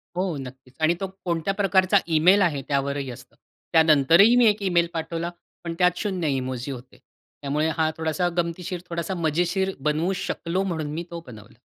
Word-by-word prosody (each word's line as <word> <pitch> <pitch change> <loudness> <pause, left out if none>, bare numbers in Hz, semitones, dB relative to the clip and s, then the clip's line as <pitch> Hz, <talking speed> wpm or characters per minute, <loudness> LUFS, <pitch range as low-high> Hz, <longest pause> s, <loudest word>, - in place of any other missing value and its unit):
हो 180 -2 -1
नक्कीच. 130 -1 -10
आणि 160 +2 +4
तो 195 - -1 0.2
कोणत्या 170 +2 -1
प्रकारचा 195 -1 +3 0.2
ईमेल 185 +6 +5
आहे 155 -7 +1
त्यावरही 140 -1 -1
असतं. 125 +2 -13 0.4
त्यानंतरही 165 - +6
मी 245 - +6
एक 210 0 +2
ईमेल 175 -3 +2
पाठवला, 165 +1 -3 0.3
पण 170 -1 -4
त्यात 180 +3 +2 0.2
इमोजी 130 -1 -2
होते, 125 -1 -10 0.4
त्यामुळे 145 +2 0
हा 160 -1 +2
थोडासा 160 +3 0
गमतीशीर, 175 +1 -2
थोडासा 170 +2 -3
मजेशीर 175 +4 0
बनवू 155 +6 0
शकलो, 180 +3 -2
म्हणून 160 -5 -3
मी 165 +2 -3
तो 170 - -5
बनवला. 110 -4 -13
165 Hz, 160 wpm, -24 LUFS, 145-180 Hz, 0.4 s, त्यानंतरही